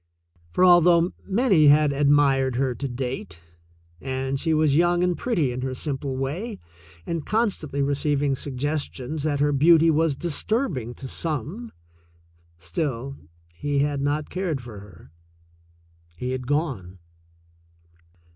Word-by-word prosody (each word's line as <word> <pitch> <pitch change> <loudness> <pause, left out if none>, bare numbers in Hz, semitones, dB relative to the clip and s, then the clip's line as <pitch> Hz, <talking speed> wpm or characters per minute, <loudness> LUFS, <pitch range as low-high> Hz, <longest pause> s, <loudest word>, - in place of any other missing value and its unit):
For, 180 - +3
although 175 -1 +5 0.2
many 195 - +4
had 145 0 +5
admired 140 -2 +3
her 130 0 0
to 140 +3 -4
date, 125 -9 -5 0.6
and 135 0 -3
she 160 - -1
was 155 -2 +3
young 175 +2 +3
and 180 -1 +1
pretty 170 - 0
in 125 +1 -4
her 130 0 -3
simple 135 -1 -3
way 175 - -4 0.5
and 165 -2 -3
constantly 185 -11 -1
receiving 145 0 0
sugges 145 +3 -3
tions 145 +4 -6
that 145 -1 -1
her 145 0 +3
beauty 165 +3 +5
was 160 -1 +1
disturbing 165 - -2
to 135 - -8
some, 165 - -4 0.9
still, 120 - -3 0.4
he 145 +10 -2
had 145 -1 -1
not 145 +1 -1
cared 180 -6 -2
for 120 -4 -10
her 95 -7 -15 0.5
— 85 0 -34
he 125 +7 -3
had 130 -1 -4
gone. 135 - -2
145 Hz, 135 wpm, -24 LUFS, 130-165 Hz, 0.9 s, although